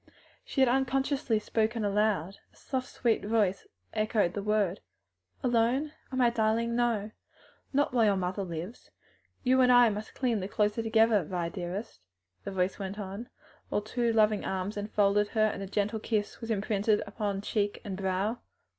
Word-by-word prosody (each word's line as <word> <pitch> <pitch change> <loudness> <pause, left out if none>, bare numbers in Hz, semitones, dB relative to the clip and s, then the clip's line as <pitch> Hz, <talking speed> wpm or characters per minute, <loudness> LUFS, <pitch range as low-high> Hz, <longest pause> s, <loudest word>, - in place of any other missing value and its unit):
She 270 - -1
had 265 - +6
unconsciously 265 -1 +1
spoken 220 +1 0
aloud. 200 -3 +1
A - - -28
soft 260 -1 -4
sweet 235 -3 0
voice 205 -3 +1 0.3
echoed 215 -4 +1
the - - -3
last 205 - -9
word. 205 -3 +1 0.6
"Alone! 245 +5 +2 0.2
ah, - - -4
my 245 -2 +4
darling, 230 +1 +1
no! 230 -3 0 0.6
not 285 -1 +1
while 235 -3 +4
your 205 -2 +4
mother 190 +1 -2
lives. 175 +5 -7 0.5
You 260 +1 +4
and 250 0 +5
I 245 -1 +7
must 210 0 -6
cling 240 -5 0
the 190 - -3
closer 210 +2 0
together, 225 -2 +3
Vi 170 +1 -3
dearest," 180 - -5 0.5
the 200 - -3
voice 185 +1 -1
went 195 0 -5
on, 205 +4 -6 0.4
while - - 0
two 235 +2 0
loving 215 -2 +3
arms 190 +2 -3
enfolded 205 0 +2
her 215 0 +2
and 210 -2 -2
a 195 - -4
gentle 205 +2 -1
kiss 215 0 -2
was 230 - -6
imprinted 210 0 +1
upon 200 -1 -3
cheek 205 0 -1
and 195 -2 -4
brow. 195 +4 -1
215 Hz, 170 wpm, -29 LUFS, 200-235 Hz, 0.6 s, I